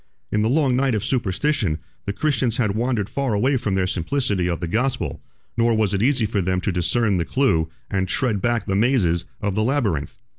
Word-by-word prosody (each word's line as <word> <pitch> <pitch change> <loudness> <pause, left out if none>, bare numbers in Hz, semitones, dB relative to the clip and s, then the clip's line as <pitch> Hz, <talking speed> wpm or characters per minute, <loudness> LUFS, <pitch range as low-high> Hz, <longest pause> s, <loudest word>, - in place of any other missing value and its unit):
In 105 - +1
the 110 - +2
long 135 -2 +2
night 130 -2 +2
of 105 - -1
superstition, 120 - 0 0.3
the - - +1
Christians 120 0 0
had 105 -5 +1
wandered 115 -2 0
far 135 -4 -1
away 130 +7 +2
from 105 -6 -1
the 95 -1 +1
simplicity 95 - 0
of 85 - -2
the 85 - -3
gospel: 120 +9 -1 0.3
nor 115 0 +2
was 110 -3 +1
it 100 - 0
easy 125 -1 +2
for 105 -1 0
them 90 +1 0
to 100 - -1
discern 95 +4 +1
the 85 - +1
clew, 85 -9 +1 0.2
and 95 -1 -1
tread 110 0 0
back 120 +1 0
the 95 - -1
mazes, 95 -6 +2 0.2
of 100 -2 -1
the 105 - 0
labyrinth. 110 - 0
110 Hz, 210 wpm, -22 LUFS, 95-125 Hz, 0.3 s, the